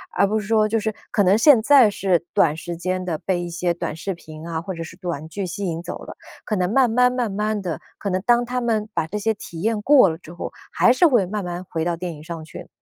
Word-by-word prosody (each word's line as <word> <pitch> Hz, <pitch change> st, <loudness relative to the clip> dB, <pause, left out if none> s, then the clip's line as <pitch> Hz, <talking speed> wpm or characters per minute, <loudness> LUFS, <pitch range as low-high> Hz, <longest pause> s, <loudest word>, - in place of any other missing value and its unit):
而 200 Hz, -, +4 dB
不 215 Hz, +2 st, 0 dB
是 210 Hz, -, -7 dB
说 215 Hz, -1 st, +3 dB
就 225 Hz, +1 st, 0 dB
是 220 Hz, 0 st, -2 dB, 0.2 s
可 205 Hz, -, +3 dB
能 190 Hz, +2 st, +4 dB
现 250 Hz, 0 st, +6 dB
在 260 Hz, -2 st, +6 dB
是 190 Hz, -4 st, 0 dB
短 150 Hz, -2 st, +3 dB
时 170 Hz, +1 st, -5 dB
间 185 Hz, +2 st, -2 dB
的 170 Hz, -3 st, -2 dB
被 185 Hz, -2 st, -1 dB
一 175 Hz, -, -5 dB
些 175 Hz, +1 st, -1 dB
短 170 Hz, -2 st, -4 dB
视 190 Hz, +4 st, -4 dB
频 155 Hz, -2 st, -11 dB
啊， 165 Hz, -1 st, -3 dB
或 190 Hz, +3 st, -5 dB
者 165 Hz, -1 st, -5 dB
是 160 Hz, -, -11 dB
短 170 Hz, -5 st, -5 dB
剧 195 Hz, +3 st, -4 dB
吸 200 Hz, +3 st, -4 dB
引 165 Hz, -2 st, -3 dB
走 -, -, -6 dB
了， -, -, -9 dB, 0.3 s
可 215 Hz, -, -1 dB
能 180 Hz, -1 st, 0 dB
慢 260 Hz, -2 st, +4 dB
慢 250 Hz, +2 st, +4 dB
慢 245 Hz, -4 st, -1 dB
慢 210 Hz, +1 st, -1 dB
地， 170 Hz, -7 st, -4 dB, 0.2 s
可 200 Hz, -, -4 dB
能 185 Hz, 0 st, 0 dB
当 240 Hz, 0 st, +4 dB
他 250 Hz, +1 st, -2 dB
们 220 Hz, -3 st, -1 dB
把 155 Hz, -, -1 dB
这 210 Hz, -, -4 dB
些 220 Hz, +2 st, 0 dB
体 170 Hz, -5 st, -9 dB
验 220 Hz, +1 st, 0 dB
过 265 Hz, -4 st, +6 dB
了 160 Hz, -, -4 dB
之 170 Hz, 0 st, -13 dB
后， 175 Hz, -, -6 dB, 0.2 s
还 -, -, +5 dB
是 340 Hz, +8 st, +5 dB
会 240 Hz, -, +3 dB
慢 205 Hz, +2 st, -4 dB
慢 175 Hz, 0 st, -5 dB
回 160 Hz, -1 st, -2 dB
到 175 Hz, -1 st, 0 dB
电 175 Hz, 0 st, -5 dB
影 150 Hz, -1 st, -12 dB
上 165 Hz, -1 st, -7 dB
去？ 155 Hz, -, -10 dB
190 Hz, 295 characters per minute, -22 LUFS, 170-220 Hz, 0.3 s, 现